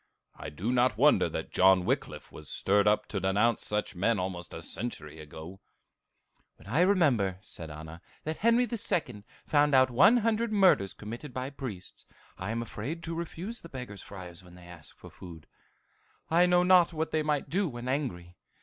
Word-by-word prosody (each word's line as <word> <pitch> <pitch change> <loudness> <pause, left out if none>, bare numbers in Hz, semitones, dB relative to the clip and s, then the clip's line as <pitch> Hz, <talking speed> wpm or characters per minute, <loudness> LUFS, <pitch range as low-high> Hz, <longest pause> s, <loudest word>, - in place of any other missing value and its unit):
I - - -7
do 95 +11 -3
not 125 -3 +2
wonder 145 +5 +4
that - - -5
John 95 -1 +4
Wickliffe - - -3
was 75 -1 -10
stirred 100 +1 +2
up 105 0 +3
to 100 - -2
denounce 100 +5 +1
such 105 -2 -2
men 105 +5 +1
almost 90 -2 -4
a - - -7
century 80 -10 -5
ago!" 80 +5 -10 1.0
"When - - -19
I 135 +11 +1
remember," 140 - +3
said 85 -5 -9
Anna, 80 +2 -10 0.2
"that 155 +1 -4
Henry 230 +3 +3
II. 165 - -2 0.2
found 145 -1 +3
out 130 -1 +5
one 150 - +6
hundred 230 0 0
murders 190 - +3
committed 120 +6 -8
by 130 +2 -3
priests, 115 -10 -8 0.3
I 95 - -6
am 115 +1 -2
afraid 140 +9 -6
to 165 - -4
refuse 170 +7 -5
the 170 - -12
beggar 125 -7 -7
friars 90 -3 -9
when 90 -1 -16
they 90 -1 -14
ask 85 -2 -14
for - - -13
food. 85 -4 -12 0.9
I 175 +2 +5
know 180 0 +4
not 180 -2 +5
what 160 0 -2
they 155 - +1
might 150 -2 -1
do 185 +4 0
when 120 -1 -7
angry. 100 - -3
120 Hz, 180 wpm, -29 LUFS, -, 1.0 s, one